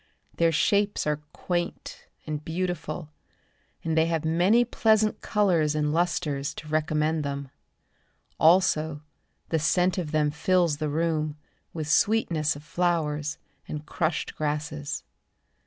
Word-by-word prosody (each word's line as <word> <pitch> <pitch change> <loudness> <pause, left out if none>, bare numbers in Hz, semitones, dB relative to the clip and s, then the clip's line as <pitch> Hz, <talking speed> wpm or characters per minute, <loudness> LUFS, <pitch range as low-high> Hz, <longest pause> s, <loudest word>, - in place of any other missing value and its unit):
Their 165 -1 +4
shapes 200 +6 +2
are 150 0 -1
quaint 175 -1 -4 0.2
and 150 -1 -4
beautiful, 165 -2 -3 0.7
And 160 -1 -1
they 160 0 +4
have 165 -2 -1
many 180 +9 +4
pleasant 220 -2 +2
colours 170 -8 +2
and 150 -1 0
lustres 155 -5 0
To 155 - -9
recommend 155 0 0
them. 140 -1 -4 0.9
Also 160 -3 +3 0.5
the 160 - +1
scent 180 +5 +2
from 175 -4 -2
them 150 -1 +1
fills 170 0 +2
the 150 0 -2
room 155 -1 -1 0.3
With 155 -3 -4
sweetness 165 -5 +2
of 145 - -10
flowers 155 -3 -1 0.3
and 150 0 -6
crushed 160 0 -2
grasses. 150 -1 -3
160 Hz, 125 wpm, -26 LUFS, 150-175 Hz, 0.9 s, Their